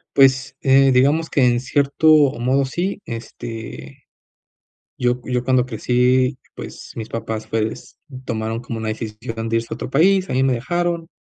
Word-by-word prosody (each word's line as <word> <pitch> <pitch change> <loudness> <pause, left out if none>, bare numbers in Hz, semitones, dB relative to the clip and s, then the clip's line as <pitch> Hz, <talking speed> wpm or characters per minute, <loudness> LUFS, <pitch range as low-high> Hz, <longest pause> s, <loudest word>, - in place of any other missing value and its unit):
Pues, 135 0 +4
eh, 135 0 +5
digamos 145 +6 +3
que 135 - +3
en 120 -1 +3
cierto 140 +4 0 0.3
modo, 130 +3 +1
sí, 185 +9 -3
este, 115 - -8 0.9
yo 125 0 +1
yo 125 -1 -1
cuando 130 -1 +2
crecí, 125 +2 +1 0.2
pues, - - -9
mis 110 -1 -6
papás, 110 -1 -4
pues, 110 0 -3 0.3
tomaron 110 -1 -3
como 120 -2 -6
una 110 0 -3
decisión 115 +1 -5
de 115 - 0
irse 115 0 -1
a - - 0
otro - - -6
país. 185 +7 +3
A - - -2
mí 130 +1 +2
me 135 - +2
dejaron 170 +6 -2
125 Hz, 160 wpm, -20 LUFS, 115-135 Hz, 0.9 s, eh